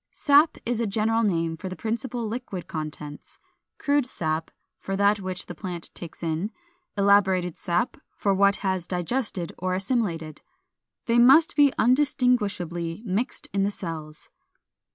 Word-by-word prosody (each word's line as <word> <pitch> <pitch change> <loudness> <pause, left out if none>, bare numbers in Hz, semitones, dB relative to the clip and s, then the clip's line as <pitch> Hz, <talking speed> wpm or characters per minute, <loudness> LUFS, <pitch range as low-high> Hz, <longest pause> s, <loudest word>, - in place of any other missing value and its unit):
415. - - -11
=Sap= 290 0 +4
is 240 -1 0
a 225 - 0
general 225 +2 +1
name 165 -6 0
for 185 +3 -6
the 185 - -6
principal 235 +2 -3
liquid 215 -5 -5
contents, 150 -2 -7 0.4
Crude 285 -2 +1
sap, 160 -7 -2 0.3
for 195 - -3
that 200 +1 +3
which 185 -2 -4
the - - -7
plant 175 -1 -7
takes 170 0 -9
in, 165 +5 -1 0.5
Elaborated 190 -3 +3
sap 175 +7 -1 0.2
for 200 - +1
what 200 +1 +4
it - - -8
has 190 -3 -1
digested 180 -1 -2
or 185 0 -1
assimilated. 185 - -2 0.6
They 235 0 +3
must 270 +7 +6
be 285 -2 +6
undistinguishably 215 - +1
mixed 220 +6 -2
in 200 - +1
the 195 - +2
cells. 160 -6 -7
195 Hz, 150 wpm, -25 LUFS, 170-230 Hz, 0.6 s, must